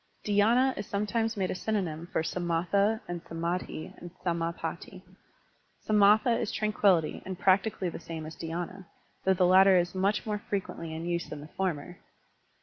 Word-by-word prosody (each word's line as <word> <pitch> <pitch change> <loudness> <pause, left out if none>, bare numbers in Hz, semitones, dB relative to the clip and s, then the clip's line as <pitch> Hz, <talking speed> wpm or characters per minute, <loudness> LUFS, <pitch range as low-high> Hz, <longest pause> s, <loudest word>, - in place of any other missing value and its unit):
DhySna 230 +6 +3
is 200 - -5
sometimes 225 +2 -1
made 190 -2 0
a - - 0
synonym 180 -5 -2
for 160 - 0
gamatha 180 +6 0
and 175 -1 -5
samMhi 170 0 -4
and 175 - -8 0.2
samSpatti. 170 +3 -3 0.8
5^^3,tha 215 +3 +5
is - - -2
tranquillity 200 -6 +2
and 185 -1 -6
practically 190 0 +2
the - - -7
same 160 -1 -7
as 155 0 -8
dhydna, 175 +4 -5 0.4
though 190 0 +4
the 180 0 +3
latter 190 +1 +7
is 175 0 +1
much 195 +2 0
more 210 -1 -2
frequently 190 -5 -4
in 160 +1 -5
use 170 0 -2
than 150 - -7
the 150 - -10
former. 175 -2 -3
185 Hz, 155 wpm, -29 LUFS, 170-205 Hz, 0.8 s, latter